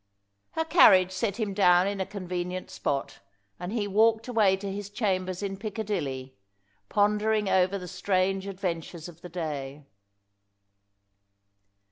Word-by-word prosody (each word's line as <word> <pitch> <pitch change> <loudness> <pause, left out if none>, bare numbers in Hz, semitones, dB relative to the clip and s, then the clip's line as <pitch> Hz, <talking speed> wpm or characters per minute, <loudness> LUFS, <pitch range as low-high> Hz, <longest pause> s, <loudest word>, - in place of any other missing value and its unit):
Her 320 - -1
carriage 190 - +6
set 200 +1 -2
him 210 -3 -1
down 180 -2 +5
in 200 -1 -2
a 190 - -2
convenient 180 -2 -5
spot, 140 -1 -3 0.4
and 180 +2 -5
he 215 -3 -1
walked 220 +3 +3
away 215 -6 +3
to 195 0 -5
his 200 0 -5
chambers 185 -3 -1
in 195 -1 -3
Piccadilly, 190 - -4 0.6
pondering 210 +1 +2
over 190 +1 +2
the 180 -2 -8
strange 190 +1 0
adventures 175 -4 -4
of 170 -1 -13
the 180 - -9
day. 150 -4 -5
190 Hz, 130 wpm, -27 LUFS, 180-205 Hz, 0.6 s, carriage